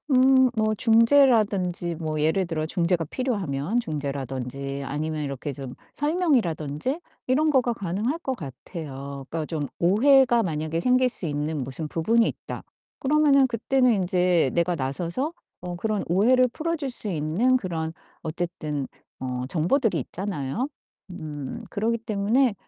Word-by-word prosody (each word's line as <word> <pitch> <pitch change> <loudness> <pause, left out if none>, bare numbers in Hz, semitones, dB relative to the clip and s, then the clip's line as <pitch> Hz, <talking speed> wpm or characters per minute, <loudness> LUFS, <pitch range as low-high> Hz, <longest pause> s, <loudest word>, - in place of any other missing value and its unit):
음 260 0 +6
뭐 215 -1 +2
중재라든지 220 -7 +3
뭐 155 -2 -3
예를 160 +5 +2
들어 155 -2 -2
중재가 170 0 +1
필요하면 200 - -1
중재라든지 140 - -4
아니면 150 +2 -3
이렇게 140 +1 -4
좀 135 -2 -7 0.2
설명이라든지 265 - 0 0.3
이런 295 +5 +3
거가 250 -4 +2
가능할 210 - -2
것 265 -6 -3
같아요. 140 - -7
그러니까 160 -1 -3
좀 150 -4 -3
오해가 240 +6 +5
만약에 155 -1 -2
생길 255 +5 +3
수 200 - -1
있는 150 -1 -2
무슨 150 +4 -5
부분이 225 +10 +2
있다. - - -6 0.4
그러면은 280 -1 +4
그때는 250 +2 +2
인제 180 -5 +2
내가 170 +1 +1
나서서 170 - -2 0.3
어 180 0 -5
그런 210 +3 -1
오해를 245 +9 +4
풀어줄 315 -4 -2
수 235 - +1
있는 180 +10 +2
그런 165 -7 -3 0.3
어쨌든 155 -4 -3 0.3
어 125 -1 -3
정보들이 180 - +2
있잖아요. 185 - -3 0.4
음 155 - -6
그러기 225 +2 0
때문에 225 +3 +1
180 Hz, 310 characters per minute, -25 LUFS, 155-245 Hz, 0.4 s, 음